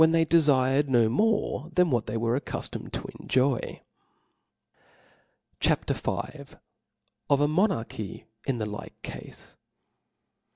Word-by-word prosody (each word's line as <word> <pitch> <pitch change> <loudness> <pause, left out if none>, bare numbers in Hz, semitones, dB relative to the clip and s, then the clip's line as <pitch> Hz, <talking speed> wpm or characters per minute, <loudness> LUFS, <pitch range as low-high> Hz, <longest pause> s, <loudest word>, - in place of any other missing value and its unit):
they 165 0 +4
dcfired 145 -4 +4
no 120 -4 +4
more 185 - +1
than 180 -3 +4
what 120 -3 +1
they 110 +2 -2
were 115 +1 +1
accuf 135 - -3
tomed - - -7
to - - -4
enjoy. 130 -1 0 1.8
CHAP, - - +2
v.. - - -1 1.2
Of 140 - +4
a 145 - +4
Monarchy 150 - -1 0.2
in 135 -3 +1
the 110 - -2
like 105 0 -8
Cafe. - - -9
135 Hz, 120 wpm, -27 LUFS, 115-160 Hz, 1.8 s, they